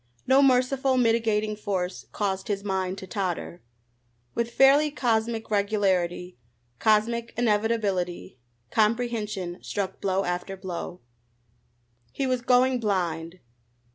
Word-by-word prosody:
No 265 +2 +5
merciful, 260 0 +3
mitigating 225 -3 +2
force 190 -3 -3
caused 190 -2 -2
his 200 -1 -2
mind 190 -1 -2
to 190 - -7
totter. 185 -3 -3 0.7
With 235 0 -1
fairly 275 +5 +5
cosmic 225 -5 -1
regularity, 190 - 0 0.4
cosmic 230 +2 +1
inevitability, 210 - 0 0.3
comprehension 215 -5 0
struck 195 -2 -4
blow 195 0 +1
after 180 +2 -3
blow. 180 -1 -6 1.1
He 275 - -2
was 255 -1 0
going 250 +1 +3
blind. 175 -5 -2
210 Hz, 105 wpm, -26 LUFS, 185-235 Hz, 1.1 s, No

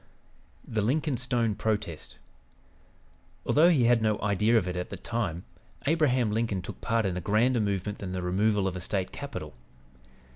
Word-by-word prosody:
THE 110 -2 -1
LINCOLN 140 +5 0
STONE 120 -3 0
PROTEST 105 -7 -3 1.3
Although 160 +4 +5
he 150 -8 +4
had 120 -1 +4
no 110 -1 +1
idea 105 +3 +2
of 95 -5 +1
it 90 - -3
at 90 0 -3
the - - -6
time, 95 -8 -3 0.4
Abraham 130 -7 +2
Lincoln 110 -4 -1
took - - -8
part 115 -2 +1
in 95 -2 -1
a - - -3
grander 115 +6 +2
movement 100 0 -2
than 95 -2 -5
the 90 -1 -3
removal 100 +2 +1
of 95 - -3
a 90 - -5
State 95 +1 -2
capital. - - -7
105 Hz, 170 wpm, -28 LUFS, 95-120 Hz, 1.3 s, Although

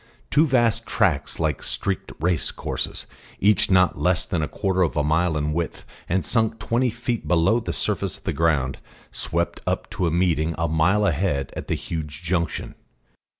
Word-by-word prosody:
Two 155 +3 +4
vast 120 -5 +2
tracks - - +1
like 80 -4 0
streaked 100 -2 -1
race 85 0 +1
courses, - - -4 0.3
each 100 -1 +3
not 90 -4 +4
less 90 0 +2
than 85 - -1
a 75 - -1
quarter 95 +1 -1
of 85 -3 +1
a 75 - +2
mile 80 +2 +2
in 75 0 -1
width, 85 0 -3 0.2
and 95 +2 +1
sunk 110 -1 +1
twenty 120 +3 +1
feet 120 0 -3
below 90 +7 +3
the - - -4
surface - - -1
of - - -24
the - - -1
ground, 75 -6 +1 0.3
swept 85 +1 -2
up - - -1
to 90 - 0
a - - 0
meeting 85 -2 +1
a 80 0 0
mile 90 +7 +3
ahead 75 -6 0
at - - -6
the - - 0
huge 80 -1 -5
junction. 85 0 -1
85 Hz, 180 wpm, -24 LUFS, 80-100 Hz, 0.3 s, Two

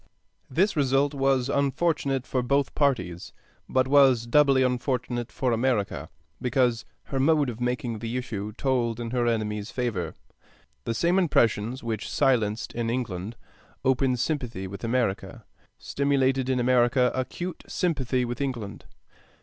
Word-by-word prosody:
This 185 +10 +2
result 140 0 +2
was 135 -2 +1
unfortunate 140 -1 0
for 130 - -1
both 140 +2 +1
parties, 90 - -1 0.4
but 130 0 +2
was 135 -4 +5
doubly 135 +1 +4
unfortunate 125 -1 -1
for 130 -2 -1
America, 110 - 0 0.3
because 125 -2 +1 0.2
her 135 - -3
mode 145 -1 +3
of 115 +1 -10
making 125 -2 -2
the 115 +3 -3
issue 105 -5 -4
told 120 -2 0
in 115 -1 -4
her 120 -1 +1
enemy's 105 -2 -1
favor. 120 -9 -3 0.7
The 115 - -2
same 175 +8 +2
impressions 120 - +1
which 110 -3 -3
silenced 115 -6 +1
in 115 -1 -2
England 115 -4 -3 0.5
open 130 -1 +2
sympathy 125 -7 -2
with 100 +3 -8
America, 115 -4 -1 0.3
stimulated 135 -2 +1
in 130 -1 +1
America 125 0 +3
acute 160 +7 -4
sympathy 130 -7 0
with 120 +3 -4
England. 120 -7 -4
125 Hz, 135 wpm, -26 LUFS, 115-135 Hz, 0.7 s, was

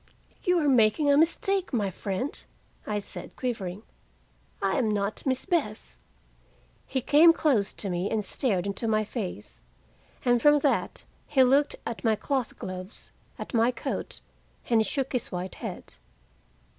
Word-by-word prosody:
"You 360 0 +3
are 305 -3 +2
making 260 +3 +4
a - - +5
mistake, 360 +5 +2
my 210 -7 0
friend," 200 +8 -4 0.4
I 210 - -1
said, 205 - -7
quivering. 210 -6 -4 0.8
"I 195 -1 0
am 230 -4 +1
not 205 0 -1
'Miss 260 -1 0
Bess'!" 220 - -2 0.9
He 260 - -1
came 305 +6 +7
close 255 -12 +2
to 205 - -4
me 180 +1 -1
and 215 -2 -1
stared 200 -9 0
into 200 +3 -3
my 215 -1 +2
face. 215 -3 -6 0.6
And 245 -1 +3
from 295 +2 +6
that 285 - 0 0.2
he 270 -3 +4
looked 275 +3 +3
at 230 - -5
my 225 -2 +3
cloth 260 +1 -2
gloves, 185 +2 -8 0.3
at - - -7
my 230 0 +4
coat, 250 - -4 0.5
and 230 - +5
he 220 - +2
shook 270 +2 -2
his 250 - -2
white 180 0 -4
head. - - -6
230 Hz, 155 wpm, -27 LUFS, 200-280 Hz, 0.9 s, came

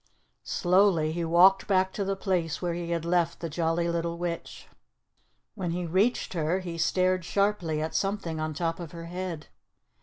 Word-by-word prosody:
Slowly 180 -3 +3
he 170 +1 -2
walked 175 +4 +5
back 190 -1 +2
to 200 - -2
the 195 0 -1
place 180 -5 -1
where 175 -2 -2
he 170 0 -4
had 170 -1 -1
left 170 -1 +1
the 165 -2 -5
Jolly 165 +1 0
Little 170 0 -2
Witch. 170 -1 -5 0.9
When 185 -5 -3
he 175 +1 -2
reached 195 +9 +1
her 165 +2 0
he 170 -2 -6
stared 185 +2 +2
sharply 180 -5 0
at 160 - -4
something 195 -5 -1
on 155 -1 -3
top 165 +1 -2
of 170 -1 -7
her 165 -1 -7
head. 175 -2 -5
170 Hz, 175 wpm, -28 LUFS, 165-185 Hz, 0.9 s, walked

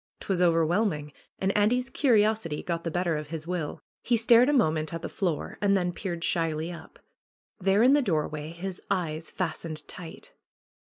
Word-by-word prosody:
'Twas 185 -2 -1
overwhelming. 165 -2 +2 0.2
And 195 +1 0
Andy's 240 +5 +2
curiosity 215 - +2
got 170 -1 -3
the 165 - -2
better 175 -1 0
of 150 -1 -5
his 155 0 -6
will. 170 -4 -4 0.2
He 240 - +2
stared 235 +3 +6
a - - +4
moment 155 - +1
at 165 - -6
the - - -2
floor 175 -6 -3
and 200 -1 +3
then 175 -1 -1
peered 170 -3 -4
shyly 165 -1 0
up. 170 - -11 0.6
There 195 +3 +3
in 260 +3 +6
the 290 - +5
doorway 155 - -1
his 180 +2 -6
eyes 160 -3 -1
fastened 165 -3 -4
tight. 170 -3 -9
175 Hz, 170 wpm, -27 LUFS, 160-205 Hz, 0.6 s, stared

